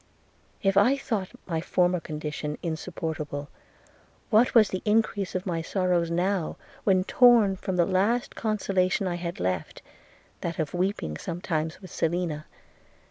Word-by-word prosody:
– - - -34
If 195 - 0
I 245 +7 +5
thought 220 -8 -2 0.2
my 165 -3 -2
former 180 +1 +2
condition 150 -1 -4
insupportable, 160 -3 -4 0.8
what 235 +4 +4
was 220 -3 +7
the 185 - -3
increase 210 -3 +1
of 185 - -2
my 170 -3 -1
sorrows 175 -1 +1
now, 180 0 0 0.3
when 185 -2 +4
torn 230 -3 +5
from 190 0 -3
the 175 -1 +4
last 200 +6 +1
consolation 195 -3 0
I 175 -1 -1
had 170 0 -5
left, 90 -2 -2 0.6
that 170 -1 -3
of 155 -4 -2
weeping 180 - -1
sometimes 165 0 -3
with 185 - -10
Selina! 165 -2 -1
180 Hz, 140 wpm, -27 LUFS, 165-200 Hz, 0.8 s, was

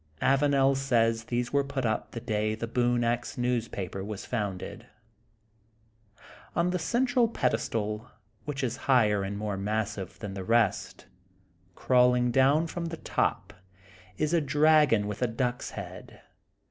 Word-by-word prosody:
' - - -38
' 80 - -31
Avanel 135 0 +3
says 115 -4 +1
these 120 +1 -2
were 140 0 +3
put 140 -2 -3
up 110 -1 -1
the 115 - -6
day 110 -2 -1
the 115 +1 -5
''Boone 120 +1 +1
Ax'^ 120 +1 -1
newspaper 115 -6 -2
was 105 0 -6
founded. 105 -6 -4 1.7
On 175 +1 +2
the 180 - -1
central 245 +4 +2
pedestal, 115 - -2 0.4
which 140 -2 -4
is 125 -1 -1
higher 105 -6 +4
and 100 +1 -4
more 105 -1 -3
massive 105 -1 -3
than 105 -4 -6
the 95 -1 -5
rest, 115 0 +1 0.7
crawUng 125 -1 +3
down 135 +6 +4
from 170 +1 -4
the 165 0 -5
top, - - -1 0.6
is 155 +2 0
a 170 - +3
dragon 150 -6 +4
with 105 +1 -5
a 125 - +3
duck's 120 +2 -2
head. - - -9
120 Hz, 145 wpm, -28 LUFS, 105-135 Hz, 1.7 s, higher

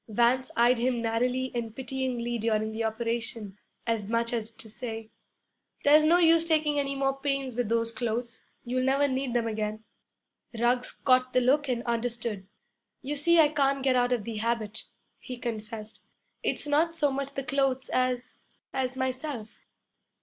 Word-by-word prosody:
Vance 240 +4 +2
eyed 240 +1 +4
him 245 0 +1
narrowly 250 +3 0
and 230 -2 -4
pityingly 250 -2 -2
during 220 -1 0
the 225 +1 -3
operation, 225 -2 -2 0.3
as 225 -3 -1
much 230 +1 0
as 225 -2 -2
to 225 0 -9
say, 225 0 -6 0.7
'There's 305 +2 +6
no 335 +3 +6
use 330 -1 +5
taking 305 -2 +2
any 275 -1 -1
more 270 0 0
pains 275 -2 -1
with 240 -2 -1
those 230 0 +1
clothes; 235 0 -3 0.2
you'll 255 +1 -1
never 275 +2 +3
need 260 -2 -2
them 235 -1 +2
again.' 215 -1 -3 0.7
Ruggs 245 +2 +2
caught 255 -1 +2
the 255 - +4
look 280 +3 +2
and 240 -1 -1
understood. 235 -4 -2 0.6
'You 290 +3 -2
see 340 +4 +4
I 305 -2 +7
can't 275 -2 +1
get 265 -1 +3
out 245 0 +2
of 240 -4 +1
the 225 0 -5
habit,' 220 -1 -2 0.3
he 250 - -7
confessed. 220 -2 -6 0.4
'It's - - 0
not 315 +3 +2
so 295 -3 +2
much 275 +1 -4
the 275 - -2
clothes 270 -2 0
as 255 -1 -2 0.2
as 260 -1 -1
myself.' 260 -3 -4
245 Hz, 165 wpm, -28 LUFS, 230-270 Hz, 0.7 s, I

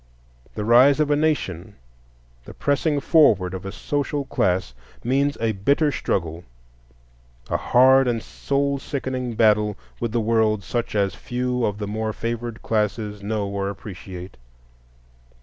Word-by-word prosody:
The 105 - -3
rise 130 +5 +6
of 150 -1 +2
a - - +4
nation, 110 - -1 0.7
the - - -11
pressing 145 +1 +1
forward 110 - +4
of 95 +1 -6
a - - -5
social 145 +5 -2
class, 90 - 0 0.3
means 140 +4 +1
a 115 0 +1
bitter 140 +9 +1
struggle, 85 - -2 1.1
a - - +2
hard 130 +1 +5
and 115 -2 -1
soul 140 0 -1
sickening 130 -3 -4
battle 105 -2 +3 0.2
with 115 - -2
the 120 - 0
world 110 -2 +1
such 120 +4 -3
as 100 -2 +1
few 125 0 -2
of 105 -2 0
the 105 - -4
more 110 +1 -3
favored 115 0 -4
classes 105 -1 -1
know 105 0 -2
or 100 0 -2
appreciate. 95 -3 -9
115 Hz, 140 wpm, -23 LUFS, 100-135 Hz, 1.1 s, rise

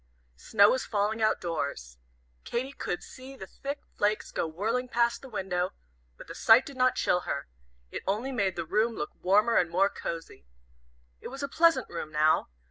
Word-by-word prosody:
Snow 200 - +4
was 260 - 0
falling 215 +1 -1
out 215 0 +3
doors. 140 - -4 0.4
Katy 255 +3 -3
could 175 - -4
see 260 +1 -11
the 190 - -8
thick 280 +8 -6
flakes 210 +1 0
go - - -1
whirling 225 +10 -2
past 235 -1 +1
the 270 - -11
window, 185 -4 -2 0.4
but - - -11
the - - -8
sight 225 +4 +6
did 280 - -9
not 255 0 +3
chill 180 - +2
her. 140 - -4 0.4
It - - -5
only 220 +8 -1
made 200 -7 0
the 170 - -3
room 220 +6 +1
look 150 - -4
warmer 210 +5 +4
and 175 - +3
more 190 +4 +2
cosy. 165 - -7 0.7
It - - -8
was 270 +2 -7
a - - 0
pleasant 325 -2 +3
room 155 -2 -6
now. 155 +1 +3
210 Hz, 185 wpm, -29 LUFS, 175-250 Hz, 0.7 s, sight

